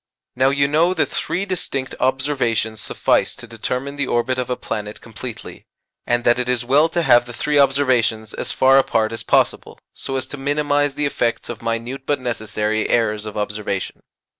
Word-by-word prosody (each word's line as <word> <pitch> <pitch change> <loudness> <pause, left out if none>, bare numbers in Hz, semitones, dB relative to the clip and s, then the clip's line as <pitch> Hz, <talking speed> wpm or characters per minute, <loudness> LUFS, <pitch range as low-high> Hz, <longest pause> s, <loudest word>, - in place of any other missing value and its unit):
Now 130 +1 +4
you 140 0 +2
know 165 +5 +2
that - - +1
three 175 +5 -2
distinct 140 -8 -3
observations 130 -5 0
suffice - - +1
to - - -10
determine 135 +3 -4
the 145 -2 -1
orbit 130 +2 0
of 125 - -3
a 125 - 0
planet 105 -3 -5
completely, 115 +1 -9 0.4
and 120 0 +1
that 120 +1 +3
it 125 0 -2
is 125 -1 0
well 145 +6 +4
to 170 +1 0
have 120 -4 +5
the 120 - -9
three 145 +5 +1
observations 130 -6 +2
as - - -3
far 135 +1 +5
apart 110 -4 +1
as 115 - -4
possible - - +1 0.2
so 135 - -4
as 130 -1 0
to - - -5
minimize 145 0 0
the 150 - -1
effects 120 -4 -1
of 120 -2 -6
minute 115 +4 -3
but 145 - +1
necessary 110 -3 -2
errors 110 -2 +1
of 105 - -7
observation. 105 -2 -3
125 Hz, 185 wpm, -20 LUFS, 115-140 Hz, 0.4 s, have